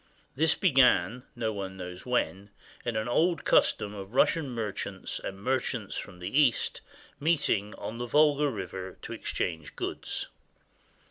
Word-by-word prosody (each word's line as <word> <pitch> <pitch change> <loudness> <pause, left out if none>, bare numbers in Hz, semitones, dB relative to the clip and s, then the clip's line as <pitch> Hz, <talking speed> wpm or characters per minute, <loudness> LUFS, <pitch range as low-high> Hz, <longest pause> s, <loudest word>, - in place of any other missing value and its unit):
This 160 +3 +3
began, 125 - +4
no 110 -2 -1
one 95 -2 -5
knows 90 +3 -7
when, 100 -5 0 0.3
in 120 -2 -2
an 110 +2 -1
old 165 +8 +2
custom 105 0 +3
of 100 +3 -8
Russian 155 0 +3
merchants 115 -5 -3
and 95 - -6
merchants 130 +1 -1
from 90 - -6
the 90 +11 0
East 125 -5 +2 0.4
meeting 140 -10 +1
on 115 +2 -6
the 120 - -3
Volga 150 +2 +4
River 95 -5 -6
to - - -5
exchange 80 -4 -3
goods. - - -3
115 Hz, 140 wpm, -29 LUFS, 95-135 Hz, 0.4 s, began